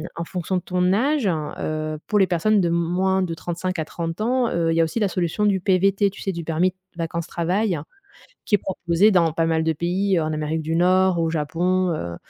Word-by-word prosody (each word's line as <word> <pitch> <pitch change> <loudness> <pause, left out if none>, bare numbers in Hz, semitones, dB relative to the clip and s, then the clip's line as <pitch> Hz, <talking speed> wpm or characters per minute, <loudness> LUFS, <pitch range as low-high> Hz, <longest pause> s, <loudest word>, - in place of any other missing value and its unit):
en 170 - -3
fonction 180 +1 -3
de - - -2
ton 180 +1 +1
âge, 270 +3 +1
hein, 155 -5 -2
heu, 155 0 -3
pour 210 - +2
les 190 - +4
personnes 190 +4 +2
de 175 - +1
moins 180 +3 +1
de 175 -3 -2
35 175 +2 -4
à 160 - -1
30 165 +4 -5
ans, 245 +1 +1
heu, 165 -1 0
il - - +1
y - - +5
a - - +5
aussi 160 +8 -3
la 210 - +2
solution 180 +3 -1
du 200 -2 +2
PVT, 195 +2 +2
tu 195 - -12
sais, 195 - -1
du 170 -2 -5
permis 170 +3 +1 0.2
vacances-travail, 170 +3 -1 0.7
qui - - 0
est - - -8
proposé 180 +1 +1
dans 170 -5 +3
pas 165 +1 0
mal 160 -1 +1
de 160 - +2
pays 180 +4 0
en 155 0 -2
Amérique 155 +1 -2
du 160 +1 -2
Nord, 185 +1 +3
au 165 - +1
Japon, 175 +4 0
heu, 85 - -5
175 Hz, 225 wpm, -22 LUFS, 165-190 Hz, 0.7 s, y